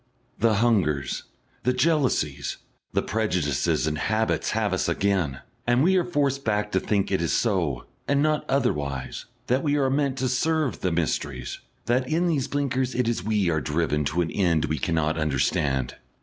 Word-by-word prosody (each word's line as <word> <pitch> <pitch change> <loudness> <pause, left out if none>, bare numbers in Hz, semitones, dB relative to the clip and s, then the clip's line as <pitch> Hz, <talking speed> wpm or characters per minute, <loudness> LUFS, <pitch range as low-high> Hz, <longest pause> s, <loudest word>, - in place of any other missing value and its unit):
The 110 0 +3
hungers, 95 - +1 0.4
the 125 - +1
jealousies, 125 - +1 0.3
the - - 0
prejudices 90 - 0
and 75 -1 -1
habits 110 +6 0
have - - 0
us - - 0
again, 90 -10 0 0.3
and 120 +2 +4
we 190 +3 +4
are 180 - +3
forced 140 -5 0
back 105 -1 0
to 95 - +2
think 100 0 0
that - - -2
it 95 - +1
is 85 - 0
so, 85 - 0 0.2
and 140 0 +2
not 155 0 +2
otherwise, 70 - -1 0.2
that 130 +2 +1
we 145 0 +1
are 135 -2 +2
meant 140 -1 0
to 130 0 0
serve 150 +1 0
the 90 - 0
mysteries; 70 -6 -2 0.3
that 125 +2 +1
in 165 +3 +1
these 150 -7 +1
blinkers 130 -2 -1
it 125 -1 +1
is 115 -6 -1
we 105 -4 +1
are 80 -1 0
driven 75 +2 0
to 80 +5 0
an 85 - -1
end 85 -5 +2
we 80 -1 -2
cannot 80 +1 0
understand. 65 -2 0
105 Hz, 180 wpm, -25 LUFS, -, 0.4 s, and